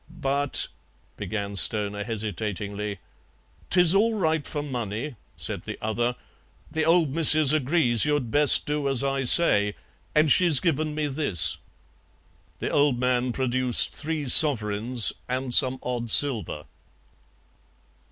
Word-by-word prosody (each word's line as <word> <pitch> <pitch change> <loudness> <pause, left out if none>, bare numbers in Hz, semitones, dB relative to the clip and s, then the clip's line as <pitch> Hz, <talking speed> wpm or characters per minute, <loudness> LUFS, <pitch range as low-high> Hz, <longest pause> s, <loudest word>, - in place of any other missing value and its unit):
"But 140 +1 -2 0.3
" - - -39
began 100 -2 -6
Stoner 105 0 0
hesitatingly. 105 -1 -5 0.7
"'Tis 175 -1 +4
all 220 +3 +1
right 160 -6 -2
for 145 -1 -4
money," 120 -1 -6 0.2
said - - -4
the - - -7
other; 120 +3 -3 0.6
"the 160 0 -2
old 165 -3 +1
Missus 155 -2 +5
agrees 140 -5 0
you'd 145 -6 -2
best 145 0 +3
do 150 -1 -3
as 135 -1 +2
I 135 -1 -2
say, 105 -9 +4 0.4
and 150 -1 +2
she's 170 -5 +4
given 155 -2 -2
me 155 -1 -2
this." 90 - 0 1.0
The - - -5
old 145 -4 +1
man 125 0 -1
produced 130 -1 -1
three 155 -2 -5
sovereigns 115 - +4 0.2
and 130 0 -3
some 130 -1 +4
odd 120 -2 -5
silver. 110 - +1
130 Hz, 125 wpm, -24 LUFS, 110-150 Hz, 1.0 s, Missus